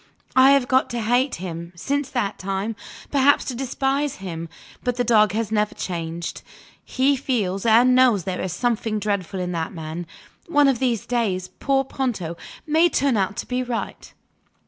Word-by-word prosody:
I 260 +1 +7
have 275 -3 +3
got 260 +1 +2
to 240 - -3
hate 245 +5 +1
him, 170 -1 -7
since 280 +10 -2
that 240 -7 -2
time 195 +3 -3 0.4
perhaps 280 0 +4
to 260 - -3
despise 270 +2 -1
him. 170 -3 -6 0.3
But 245 -1 0
the 245 - 0
dog 215 -4 +4
has 220 0 -2
never 210 -1 0
changed; 170 -1 -4 0.4
he 270 +2 +2
feels 220 -7 -1
and 240 +3 +6
knows 250 -7 +4
there 185 +1 -3
is 185 - -3
something 225 +2 -1
dreadful 200 -3 -2
in 180 0 -2
that 165 -2 -3
man. 160 +1 -6 0.4
One 290 -4 +4
of 265 -4 +2
these 240 -5 0
days, 195 -7 -1
poor 270 -1 +2
Ponto 235 -11 -3 0.3
may 320 +3 +4
turn 275 -5 +1
out 195 -1 0
to - - -3
be 250 0 -1
right. 245 -2 -5
230 Hz, 170 wpm, -23 LUFS, 185-260 Hz, 0.4 s, I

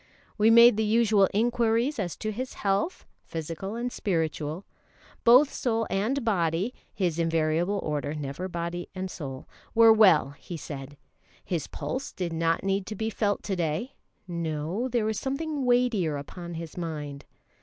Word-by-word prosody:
We 215 +1 +4
made 235 -1 +8
the 220 - +2
usual 215 -3 +4
inquiries 235 +4 +1
as 175 -6 -2
to 215 - -3
his 255 +5 -5
health, 200 - -1 0.2
physical 165 +6 -5
and 245 +1 -3
spiritual. 160 -3 -2 0.6
Both 255 +5 +6
soul 225 -2 0
and 230 +7 0
body 180 +1 +1 0.2
(his 175 -4 -1
invariable 165 +3 +1
order, 150 -1 -2
never 150 +5 -4
body 175 0 -4
and 185 0 -4
soul) 135 -4 -7 0.3
were 225 -1 +8
well, 185 -10 +5
he 165 +4 -8
said; 145 -2 -8 0.5
his 170 -4 -2
pulse 265 +2 -5
did 175 -3 -3
not 165 0 +1
need 195 0 0
to 215 - -5
be 220 +2 -2
felt 205 -2 0
to 195 - -2
day: 170 - -2 0.3
no, 170 +5 -2
there 240 -3 0
was 220 0 -1
something 280 +1 -2
weightier 240 -11 +2
upon 170 +4 -7
his 165 -1 -7
mind. 150 -5 -5
190 Hz, 155 wpm, -27 LUFS, 165-225 Hz, 0.6 s, made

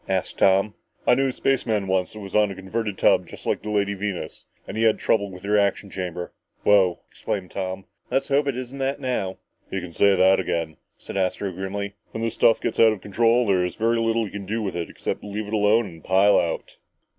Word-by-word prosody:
asked - - -1
Tom. 95 +2 +4 0.3
"I - - +5
knew 135 +2 +2
a - - 0
spaceman 115 -6 0
once 95 -1 0
that 110 - -9
was 100 -2 -9
on 105 -1 +4
a 100 - -6
converted 100 +2 -3
tub - - +3
just - - -12
like - - 0
the 105 - -6
Lady 100 -1 +1
Venus 100 -2 -5 0.2
and - - -6
he 110 - -1
had 110 -1 +4
trouble 100 -2 +1
with 90 0 -11
the 100 - -5
reaction 100 -1 +1
chamber." 90 -2 -5 0.3
"Wow!" 95 -4 +4
exclaimed 95 -3 -5
Tom. 95 0 -4 0.2
"Let's 135 +3 0
hope 140 +1 +2
it 135 -3 -1
isn't 130 +2 -6
that 135 +1 -1
now!" 125 -8 -2 0.3
"You 95 - -2
can 90 -2 -8
say 100 +2 +4
that 95 +1 +5
again," 80 -2 -2 0.2
said - - -7
Astro 95 +1 -1
grimly. 100 +2 -4 0.2
"When 115 - -3
this 115 - -1
stuff 115 - +4
gets - - -3
out 110 -1 +7
of 100 - -9
control, 115 +4 +2
there's 90 -3 +1
very 115 +1 +1
little 115 0 +1
you 100 - -8
can 100 -2 -7
do 110 +2 -2
with 95 -3 -3
it, 85 -1 -3
except - - -4
leave 105 +1 -4
it 105 - -7
alone 110 +2 +3
and 80 -5 -11
pile 95 +2 +4
out!" 85 -1 -3
100 Hz, 225 wpm, -24 LUFS, 95-115 Hz, 0.3 s, out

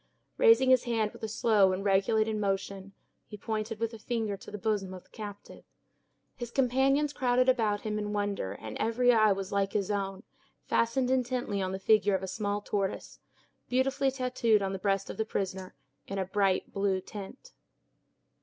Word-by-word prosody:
Raising 455 - +6
his 255 -1 +4
hand 225 -3 0
with - - -14
a 220 - -2
slow 215 -3 +3
and 195 +2 -4
regulated 215 +3 +2
motion, 195 -1 -3 0.3
he 210 - -9
pointed 215 +1 -3
with 230 0 -2
a 225 - -9
finger 220 -3 -2
to - - -12
the 210 - -6
bosom 200 -3 -2
of 185 - -11
the - - -31
captive. 205 -2 -9 0.7
His 240 -1 -6
companions 270 +3 +2
crowded 250 -1 +2
about 220 -5 +2
him 215 -1 -2
in 210 0 -3
wonder 205 - -2
and 110 +1 -8
every 245 +2 +3
eye 215 -2 +5
was 195 -1 -2
like 200 -1 0
his 205 -1 0
own, 195 -1 -3 0.4
fastened 250 +2 +1
intently 245 -5 0
on 185 0 -2
the 190 - -3
figure 205 0 +3
of 190 - -3
a - - -3
small 205 +2 -2
tortoise, 200 -1 -3 0.5
beautifully 270 +2 +1
tattooed 250 -5 +1
on 195 0 -2
the 195 - -4
breast 195 0 0
of - - -10
the 220 - +1
prisoner, 190 -3 -4 0.3
in 195 - -4
a 190 - 0
bright 195 0 0
blue 195 -1 +1
tint. 210 - -10
210 Hz, 180 wpm, -29 LUFS, 195-240 Hz, 0.7 s, Raising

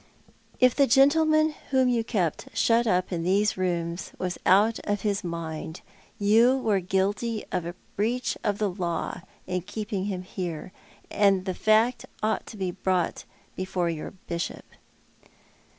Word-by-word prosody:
" - - -32
If 255 -1 +5
the 280 -1 +4
gentleman 310 +4 +4 0.2
whom 260 -1 +3
you 240 -2 +2
kept 185 -9 -1
shut 235 +1 +3
up 185 -2 +1
in 170 -2 -1
these 200 +4 +2
rooms 170 -2 -2
was 180 -1 -3
out 210 +4 +5
of 205 -1 -2
his 205 -1 -1
mind 165 -1 -5 0.4
you 230 +5 +4
were 215 -6 +1
guilty 200 +5 -1
of 170 - -2
a 175 - -6 0.2
breach 240 +5 0
of 205 -1 0
the 205 -2 0
law 175 -3 -3 0.2
in 180 0 -2
keeping 205 +1 -4
him 190 -3 -3
here, 180 -2 -5 0.4
and 195 -2 +3
the 190 - -1
fact 220 +5 +2 0.2
ought 220 0 0
to 220 - -9
be 190 -2 -2
brought 185 -1 -1 0.3
before 185 -2 -1
your 155 -2 -5 0.2
Bishop." 170 0 -4
195 Hz, 150 wpm, -26 LUFS, 180-225 Hz, 0.4 s, If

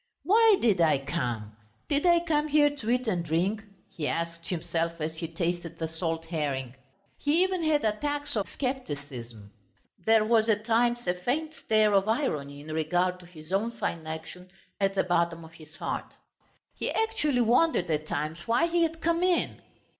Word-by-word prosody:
"Why 440 +1 +6
did 210 -7 +3
I 155 -4 +4
come? 125 -7 -3 0.3
Did 290 +4 +1
I 345 -1 +5
come 305 -3 +1
here 295 -1 +4
to 230 -6 -5
eat 250 0 +1
and 180 -5 0
drink?" 180 +7 0 0.2
he 165 -7 -4
asked 170 0 -3
himself 165 -1 -2
as 160 +1 -3
he 165 - -3
tasted 170 0 -3
the 160 - -2
salt 165 0 -3
herring. 140 -6 -2 0.5
He 310 +5 +3
even 375 -1 0
had 305 -5 +2
attacks 290 +7 -1
of 205 -3 -1
scepticism. 140 - -5 0.5
There 220 -1 +4
was 225 0 +3
at 215 +1 +1
moments 240 +1 +2
a 180 - +2
faint 275 - -2
stir 215 -6 +2
of 195 +1 +3
irony 145 - -1
in 155 +1 -7
regard 180 +3 0
to 175 - -14
his 165 0 -11
own 210 +4 +1
fine 165 -7 -3
action 160 +3 -7 0.3
at 195 0 +1
the 190 - +3
bottom 170 -2 0
of 160 - -14
his 160 -2 -15
heart. - - -4 0.6
He - - -3
actually 305 - +1
wondered 240 - +3
at 155 0 -1
times 155 +3 -3
why 235 +8 +3
he 340 0 +1
had 325 0 0
come 335 +1 +1
in. 365 -1 +1
190 Hz, 175 wpm, -28 LUFS, 160-265 Hz, 0.6 s, Why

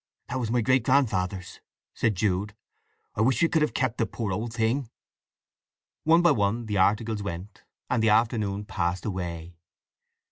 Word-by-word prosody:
"That 130 - -2
was 115 -3 -2
my 120 +1 +2
great 130 +1 +3
grandfather's," 95 -9 0 0.3
said 110 -3 0
Jude. 100 +2 -1 0.6
"I - - -1
wish 125 +1 +3
we 170 - +4
could 160 - +1
have 150 - 0
kept 130 -3 -1
the 115 - +1
poor 110 -1 -4
old 110 +5 -3
thing!" 115 +2 0 1.2
One 165 +2 +5
by 175 - +6
one 115 -1 0
the 105 -2 -2
articles 105 +3 +2
went, 95 0 -7 0.2
and 125 - +1
the 110 - +3
afternoon 105 -2 +1
passed 85 -1 -2
away. 85 -4 -5
110 Hz, 165 wpm, -26 LUFS, 100-120 Hz, 1.2 s, by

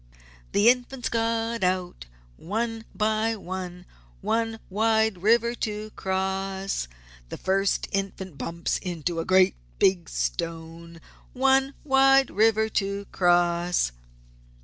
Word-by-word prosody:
"The 205 +3 +4
Infants 250 0 +2
got 230 -1 -1
out, 180 - -1 0.3
one 225 - -3
by 220 +1 +1
one 180 -2 -7 0.4
One 225 0 -1
wide 220 -1 +1
river 235 +3 +3
to 215 -2 -4
cross! 190 - -2 0.5
First 195 +1 0
Infant 195 -3 -3
bumps 170 +4 -3
into 170 -1 -3
a 165 - -2
great 185 0 +5 0.2
big 185 -3 +2
Stone 165 - -4 0.3
One 270 +1 +2
wide 270 -1 +4
river 220 +1 +3
to 200 -1 -2
cross!" 175 - +2
195 Hz, 105 wpm, -26 LUFS, 180-225 Hz, 0.5 s, great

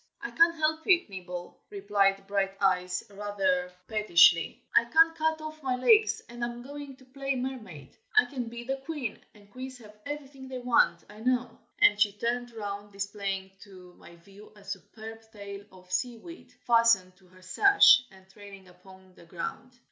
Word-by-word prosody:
"I - - -6
can't 335 0 +4
help 315 0 -1
it, 350 - +3
Nibble!" 180 -2 -8
replied 200 - +1
Brighteyes, 195 -2 0
rather 195 -3 -1 0.2
pettishly. 170 -6 +4
"I 235 - +6
can't 325 +5 +4
cut 320 0 0
off 310 0 -8
my 260 -2 -1
legs, 430 - +3
and 240 0 -7
I - - +1
am 240 0 -8
going 285 0 -9
to 260 - -20
play 275 +1 -3
mermaid. 220 - -7 0.2
I 430 - +7
can 255 -4 -5
be 235 +1 -8
the 270 +2 -3
queen, 270 -4 -5 0.2
and 205 -1 -20
queens 260 +2 -8
have 210 -3 -15
everything 275 -2 -7
they 260 0 -6
want, 245 -1 +2
I 210 - -14
know." 250 0 0 0.3
And 205 0 +5
she 205 -1 +4
turned 240 +3 -2
round, 205 -2 -6
displaying 195 -1 -4
to 185 -4 -14
my 170 - -15
view 195 +5 -17
a 205 - -17
superb 220 +2 -9
tail 200 -1 -9
of 185 -1 -17
seaweed, 245 - -4
fastened 230 -6 +4
to 185 -1 -24
her 185 +1 -20
sash, 400 - +6
and 190 0 -19
trailing 195 -1 -14
upon 185 +1 -18
the 170 - -17
ground. 185 +9 -7
215 Hz, 170 wpm, -28 LUFS, 195-260 Hz, 0.3 s, I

